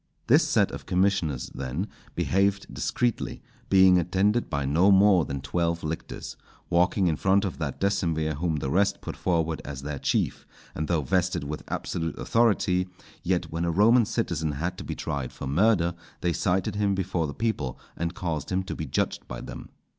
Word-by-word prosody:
This - - +5
set - - +2
of - - -8
commissioners, 90 -8 +1
then, 70 +9 -3 0.3
behaved 100 +1 +1
discreetly, 120 -2 -1 0.3
being 95 -1 +6
attended 95 +7 +1
by 70 -1 -1
no 80 +8 +4
more 95 -3 +6
than 70 -1 -4
twelve 85 +4 -1
lictors, 80 +1 -5 0.4
walking 90 +3 +3
in 85 -3 +2
front 95 +5 +2
of 95 - -4
that 75 -5 -3
decemvir 85 -6 0
whom 80 0 0
the 70 -2 -2
rest 100 +5 +2
put - - -6
forward 80 -3 0
as 70 -1 -7
their 75 -1 -4
chief; - - -1 0.3
and 80 +1 -3
though 85 -3 +1
vested 90 +1 0
with 75 +1 -5
absolute 80 -1 -3
authority, 100 -5 +2 0.3
yet 90 -2 -1
when 85 +1 -2
a 85 - +1
Roman 110 +7 +5
citizen 80 -6 -1
had 85 +6 -2
to - - -5
be - - -5
tried 70 -3 -3
for - - -7
murder, 85 +4 +3 0.3
they 90 -1 +1
cited 95 +5 0
him 100 -1 +2
before 90 -4 -1
the 70 - -7
people 110 - -2 0.2
and 85 0 -3
caused 80 -4 -3
him 95 +1 +1
to 95 - -5
be 80 - -5
judged - - -1
by - - -6
them. - - -8
85 Hz, 180 wpm, -26 LUFS, 80-95 Hz, 0.4 s, being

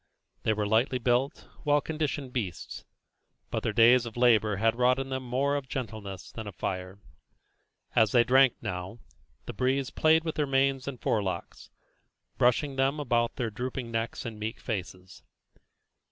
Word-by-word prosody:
They 110 - +1
were 105 -1 -1
lightly 115 +5 +2
built, 125 +3 0 0.2
well 145 0 +3
conditioned 145 -4 -3
beasts, 95 - -5 0.7
but - - -1
their - - -1
days 120 +1 +5
of 115 - -9
labour 110 -4 +4
had 110 +3 +2
wrought 125 +1 +3
in 135 0 -4
them 130 0 -2
more 130 +3 0
of 140 -2 -4
gentleness 105 -6 -6
than 110 -2 -7
of 100 - -8
fire. 95 +1 -4 1.0
As 110 -2 +4
they 120 -2 +5
drank 130 0 +5
now, 90 +5 -5 0.5
the - - -6
breeze 130 +4 0
played 160 +1 +3
with 160 -1 -2
their 150 -2 -1
manes 135 -1 +1
and 135 -3 -5
forelocks, 95 -5 -2 0.7
brushing 135 +3 +2
them 135 +3 +1
about 120 -4 0
their 120 -3 -2
drooping 125 +1 -5
necks 115 0 -3
and 110 -2 -6
meek 110 +2 -4
faces. 95 -4 -6
120 Hz, 160 wpm, -28 LUFS, 110-135 Hz, 1.0 s, days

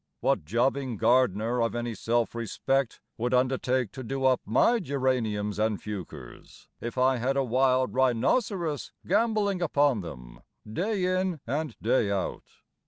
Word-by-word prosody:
What - - +1
jobbing 125 - 0
gardener 115 0 +2
of 115 0 0
any 120 0 -2
self 115 +1 0
respect 120 +2 -1 0.2
Would 125 +2 +1
undertake 130 -2 +1
to 130 - -8
do 135 +2 -2
up 130 -1 +3
my 230 - +3
genariums 120 - -1
and 110 -2 0
fuchers 105 -5 -9
If 120 +2 -6
I 130 0 +3
had 130 +3 0
a 135 - +3
wild 130 +1 +2
rhinoceros 145 - 0
gambolling 205 -1 +1
upon 145 - +2
them 60 -8 -10 0.3
Day 185 - -1
in 185 -2 0
and 145 +1 -3
day 115 -2 +2
out? 100 -2 -2
130 Hz, 140 wpm, -27 LUFS, 115-140 Hz, 0.3 s, up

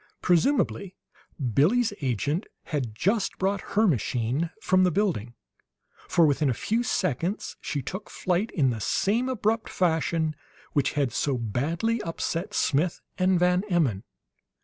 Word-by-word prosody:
Presumably 195 - +2 0.6
Billie's 210 - +3
agent 140 - -1 0.2
had 130 -8 -3
just 200 - 0
brought 195 0 0 0.2
her 220 - +6
machine 130 - 0
from 185 -3 +3
the 180 - +4
building, 155 - -1 0.7
for, 170 - +5
within 145 -1 +2
a 125 - 0
few 225 - 0
seconds, 185 - -1
she 140 -3 -3
took 190 - -6
flight 185 +4 -1
in 135 -6 +2
the 110 -2 -4
same 225 - +1
abrupt 225 -2 0
fashion 160 -2 0 0.4
which 145 -2 +1
had 140 -4 0
so 140 -3 0
badly 160 - -1
upset 170 +4 -3
Smith 155 +5 +1 0.2
and 185 0 +3
Van 180 +1 +3
Emmon. 140 - +1
170 Hz, 135 wpm, -26 LUFS, 140-200 Hz, 0.7 s, her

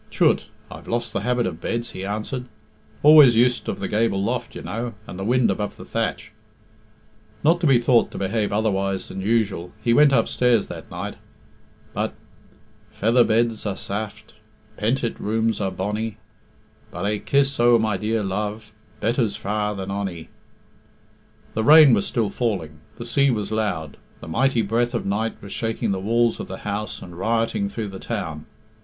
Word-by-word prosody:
"Chut! - - +2 0.2
I've - - -10
lost 120 +1 -2
the - - 0
habit 125 -1 0
of 85 -2 -4
beds," 115 +4 -3
he 95 - -7
answered. 110 +6 -3 0.6
"Always 150 -5 +8
used 120 +2 +2
of - - -2
the 95 - -3
gable 105 -2 +1
loft, 120 +4 -2
you - - -7
know, 115 0 -4
and 90 - -8
the - - -3
wind 125 +3 +3
above 105 -1 -3
the - - -10
thatch." 110 -1 -3 1.1
Not 170 +3 +3
to 165 - +3
be 135 -3 +6
thought 120 0 +3
to - - -9
behave 105 +2 -1
otherwise 100 -2 0
than 95 - -5
usual, 100 -5 0
he 115 +2 +1
went 145 +3 +6
upstairs 125 -4 +2
that - - -8
night. - - -6 0.8
But - - -2 0.8
"Feather 115 +4 +3
beds 115 0 +1
are 100 - -2
saft, 105 +1 -6 0.4
Pentit 115 +2 -1
rooms 110 +1 0
are 95 - 0
bonnie, 105 +4 -3 0.7
But - - -5
ae 105 +1 0
kiss 140 +1 +1
o' 120 0 +6
my 110 -2 0
dear 110 +3 -1
love 105 +3 -3 0.3
Better's 115 0 +1
far 105 +1 -2
than 95 0 -5
ony." 95 -5 -4 1.2
The 110 - -1
rain 150 0 +8
was 100 -3 +2
still 115 -4 0
falling, 90 -11 -2 0.2
the 120 - -8
sea 140 +4 +3
was 110 -5 -1
loud, 95 -9 -2 0.2
the - - -10
mighty 120 +6 +1
breath 120 +4 0
of 115 - -2
night 105 +3 -1
was 100 - -9
shaking 115 -1 -1
the 95 - -1
walls 115 +4 +1
of - - -5
the - - -6
house 105 0 -3
and 90 -1 -10
rioting 115 - 0
through 110 - -4
the 95 -1 -8
town. 80 -9 -5
110 Hz, 175 wpm, -23 LUFS, 100-120 Hz, 1.2 s, Always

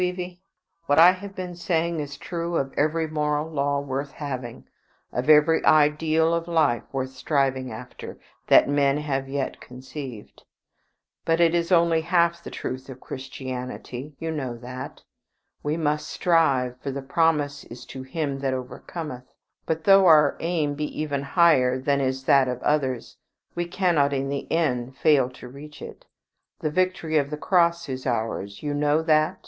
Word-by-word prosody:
Evie, 180 0 -3 0.5
what 145 - +3
I 170 +3 +9
have 195 +2 -8
been 180 -2 -5
saying 170 -1 -1
is 145 -1 -5
true 170 +2 -4
of 135 -1 -2
every 155 +2 +1
moral 150 0 -1
law 145 -2 0
worth 140 0 -4
having, 130 -5 -6 0.5
of 125 +4 -2
every 155 +1 +5
ideal 155 +2 +3
of 170 0 -1
life 155 -8 +2
worth 130 -1 -3
striving 130 -1 -1
after, 110 - -9 0.3
that - - +6
men 140 0 +2
have 135 -3 -2
yet 135 -1 -3
conceived. 130 -2 -9 0.8
But 165 0 +1
it 170 -1 +4
is 170 +1 0
only 170 -2 +4
half 170 0 +1
the - - -7
truth 130 +1 -6
of 130 -1 -9
Christianity. 130 +1 -7
You 165 0 -4
know 130 -6 -4
that. 125 +2 -8 0.6
We 150 +2 -1
must 150 -1 -1
strive, 135 -8 +1
for 140 - -4
the 140 0 -5
promise 145 -1 +1
is 120 +1 -11
to 130 - -6
him 140 0 -3
that 135 -1 -1
overcometh; 130 +1 -7 0.4
but 160 0 -1
though 195 0 +6
our 150 -3 +6
aim 160 -4 -1
be 150 +1 -5
even 145 -2 -1
higher 140 -5 +3
than 140 +1 +1
is 130 0 -1
that 135 0 +4
of 125 -1 -3
others, 135 -5 -1 0.4
we 175 0 -2
cannot 170 -6 +1
in 135 0 -1
the 140 0 -4
end 130 -6 0
fail 140 -5 +3
to 125 0 -12
reach 145 +4 -11
it. - - -11 0.5
The 155 - -2
victory 175 -2 +1
of 140 -1 -2
the 150 - -4
Cross 170 0 +2
is 130 0 -5
ours. 110 -3 -3
You 145 -1 -2
know 150 +2 +1
that? 155 +3 +2
150 Hz, 165 wpm, -24 LUFS, 130-165 Hz, 0.8 s, I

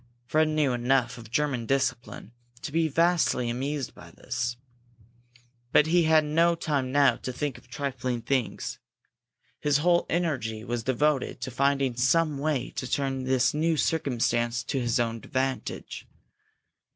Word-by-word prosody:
Fred 155 +5 +2
knew 155 -4 +1
enough 125 0 +1
of 115 -2 -12
German 130 -3 -1
discipline 130 -5 -2 0.3
to - - -4
be 165 +1 +2
vastly 165 -6 +2
amused 135 +2 -3
by - - -13
this. 120 0 -4 1.1
But 150 - +5
he 170 +1 +3
had 155 -1 +4
no 165 +3 +3
time 145 -6 -1
now 140 0 +4
to 130 - -5
think 140 +1 -4
of - - -24
trifling 125 -2 -3
things. 130 -4 -2 0.8
His 145 -1 +2
whole 175 +3 +2
energy 130 -11 -1
was 120 0 -3
devoted 135 +3 0
to 130 - -4
finding 140 0 +1
some 145 +4 +2
way 145 -4 -1
to 130 - -3
turn 135 -2 -1
this 130 -1 +2
new 160 +2 +1
circumstance 120 -6 0
to 135 - -2
his 120 +1 0
own 115 -1 0
advantage. 130 +3 -4
135 Hz, 145 wpm, -27 LUFS, 120-150 Hz, 1.1 s, But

